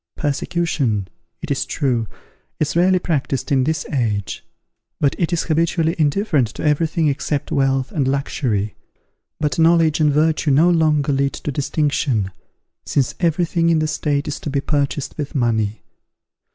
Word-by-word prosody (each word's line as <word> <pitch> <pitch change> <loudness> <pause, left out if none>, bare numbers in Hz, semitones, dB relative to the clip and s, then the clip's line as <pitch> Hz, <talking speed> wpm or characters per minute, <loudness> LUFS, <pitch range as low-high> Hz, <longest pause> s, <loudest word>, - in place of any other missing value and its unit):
Persecution, 140 - -1 0.4
it 160 - -4
is 140 - 0
true, 125 -6 -1 0.5
is 155 +1 -1
rarely 185 +2 +4
practised 145 -7 -2
in 130 -2 +3
this 155 0 -1
age, 105 -7 -1 0.6
because 140 - +2
it 170 - +1
is 170 -1 0
habitually 165 +1 +1
indifferent 150 - +2
to - - -8
every 150 +2 +2
thing 160 0 0
except 145 0 -2
wealth 135 -1 +1
and 140 -4 0
luxury; 120 -7 -1 0.7
but 150 -1 -1
knowledge 165 -1 +4
and 150 -1 +4
virtue 155 +1 +2
no 155 +6 +5
longer 155 -4 +2
lead 140 0 +1
to 145 - -4
distinction, 140 -7 0 0.5
since 135 -4 0
every 170 0 +2
thing 170 0 +1
in 165 - +3
the 155 - +1
state 150 -2 -1
is 145 - -3
to - - -5
be 140 0 0
purchased 140 0 -2
with 145 0 -4
money. 110 -4 0
145 Hz, 155 wpm, -20 LUFS, 135-160 Hz, 0.7 s, no